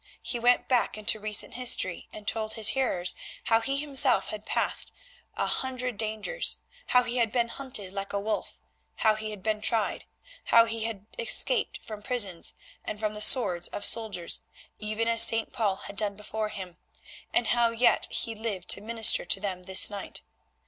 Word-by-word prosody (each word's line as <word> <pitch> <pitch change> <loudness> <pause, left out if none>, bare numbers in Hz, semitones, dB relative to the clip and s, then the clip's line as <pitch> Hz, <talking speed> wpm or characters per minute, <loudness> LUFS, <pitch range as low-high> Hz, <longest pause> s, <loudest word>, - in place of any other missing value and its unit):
He 240 - -3
went 245 +1 +2
back 245 -4 0
into 215 +1 +3
recent 210 0 -1
history 235 -7 0
and 210 -1 -11
told 220 -1 -2
his 220 -2 +4
hearers 185 -10 -1 0.3
how 225 0 +2
he 275 +4 -2
himself 280 -3 +3
had 215 0 -8
passed - - +1 0.5
a - - 0
hundred 255 -3 -3
dangers; 220 - +1 0.3
how 250 0 +3
he 245 +1 -3
had 230 -3 +1
been 235 -1 0
hunted 230 -8 -2
like 195 0 -5
a 200 - -2
wolf, 215 +2 -4 0.4
how 220 -1 +2
he 215 0 -5
had 210 -3 -9
been 215 -1 -2
tried, 220 -1 0 0.4
how 230 0 +5
he 225 -1 -3
had 210 -3 -6
escaped 480 - +2
from 215 -2 -9
prisons 205 -8 0 0.3
and 210 - -6
from 215 -1 -2
the 210 - -6
swords 195 -8 +4
of - - -4
soldiers, 215 -7 +2 0.4
even 215 +2 -3
as 230 0 +3
St. 225 -1 +5
Paul 210 -5 0
had 200 - -10
done 205 -1 -1
before 215 +1 -5
him, 190 -4 -9 0.5
and 230 - 0
how 240 -1 +2
yet 230 +2 +2
he 230 - -3
lived 210 -5 -6
to - - +4
minister 225 0 +3
to 195 - 0
them 185 -3 -5
this 190 0 +3
night. 205 -1 -6
220 Hz, 180 wpm, -27 LUFS, 205-235 Hz, 0.5 s, how